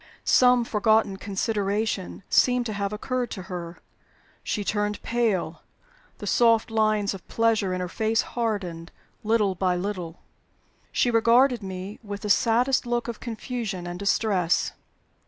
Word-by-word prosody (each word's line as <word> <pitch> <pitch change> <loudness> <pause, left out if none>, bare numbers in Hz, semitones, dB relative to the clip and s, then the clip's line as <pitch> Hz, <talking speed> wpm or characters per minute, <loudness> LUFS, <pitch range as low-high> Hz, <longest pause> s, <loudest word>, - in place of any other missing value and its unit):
Some 250 -1 +5
forgotten 215 -2 +2
consideration 200 0 -2
seemed 250 -1 +3
to 220 - -3
have 200 0 -2
occurred 245 +3 -2
to 185 - -6
her. 175 -2 -7 0.7
She 210 - -2
turned 210 0 -1
pale; 220 -8 -1 0.6
the - - -8
soft 230 -1 +3
lines 215 -2 +1
of 195 - -11
pleasure 225 -4 +1
in 185 0 -2
her 180 - -2
face 220 +4 0
hardened, 195 -8 -3 0.3
little 210 -3 +2
by 185 0 0
little; 180 -3 -5 0.7
she 245 - +2
regarded 235 +2 +4
me 190 +1 -7
with 205 -2 -7
the 210 - 0
saddest 245 +4 +2
look 240 0 -1
of 235 -2 -5
confusion 225 -5 -5
and 175 0 -6
distress. 200 -4 +1
210 Hz, 135 wpm, -25 LUFS, 190-230 Hz, 0.7 s, Some